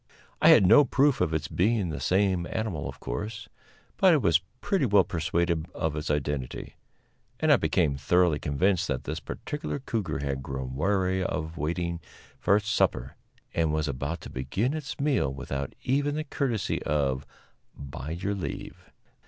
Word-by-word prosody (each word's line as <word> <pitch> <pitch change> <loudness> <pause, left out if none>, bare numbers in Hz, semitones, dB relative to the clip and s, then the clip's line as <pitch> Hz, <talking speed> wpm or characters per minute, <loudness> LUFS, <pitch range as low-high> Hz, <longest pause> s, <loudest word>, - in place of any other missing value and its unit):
I - - +7
had - - +8
no 115 +10 +8
proof 135 +1 +2
of - - +2
its 80 0 -1
being 100 +1 +1
the 75 -4 -4
same 95 +3 +1
animal, 100 -10 -3
of - - -10
course, 105 - -5 0.5
but 185 -2 +6
I - - +5
was 85 - +3 0.2
pretty 170 -5 +1
well 100 -2 +5
persuaded 85 0 -1
of 80 -2 -1
its 75 0 -4
identity, 75 -3 -2 0.7
and - - +3
I - - +6
became 70 -2 +1
thoroughly 85 +2 +3
convinced 90 +6 +1
that - - -2
this 80 +3 -4
particular 145 - -5
cougar 115 -7 -3
had 70 -1 -3
grown 65 -1 -5
weary 95 +3 +1
of 80 -2 -3
waiting 85 +2 -2 0.4
for 100 - +3
its 105 0 0
supper, - - +1 0.4
and 80 -2 +1
was 80 0 0
about 70 +5 -3
to - - -9
begin 75 - -1
its 155 -3 -5
meal 140 - +1
without 70 0 -5
even 145 +3 +1
the 155 - -1
courtesy 135 -8 -1
of 70 -2 0 0.5
"by 70 0 -7
your 90 +5 -2
leave." 100 - -6
85 Hz, 165 wpm, -27 LUFS, 75-105 Hz, 0.7 s, had